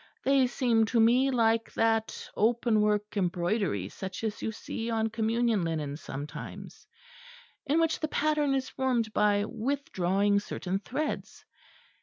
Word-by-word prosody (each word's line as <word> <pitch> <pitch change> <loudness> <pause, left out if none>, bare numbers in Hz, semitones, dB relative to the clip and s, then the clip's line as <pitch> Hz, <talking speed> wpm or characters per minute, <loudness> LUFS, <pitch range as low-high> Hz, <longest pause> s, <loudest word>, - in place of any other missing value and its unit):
They 270 -1 +4
seem 235 -3 +2
to 230 +2 +1
me 245 +4 +5
like 230 -3 +2
that 225 -1 0
openwork 210 -2 +2
embroidery 175 - 0
such 190 - -7
as 215 -2 -3
you 220 - -2
see 225 +1 -5
on 225 -1 0
Communion 230 -2 +1
linen 155 -4 -2
sometimes, 145 0 -8 0.8
in 300 +4 +3
which 325 -1 +1
the 310 - -1
pattern 300 -2 +1
is 265 -1 -1
formed 240 -5 -1
by 205 -1 +3
withdrawing 205 -5 0
certain 195 -2 -3
threads. 285 +9 -4
225 Hz, 130 wpm, -29 LUFS, 200-245 Hz, 0.8 s, me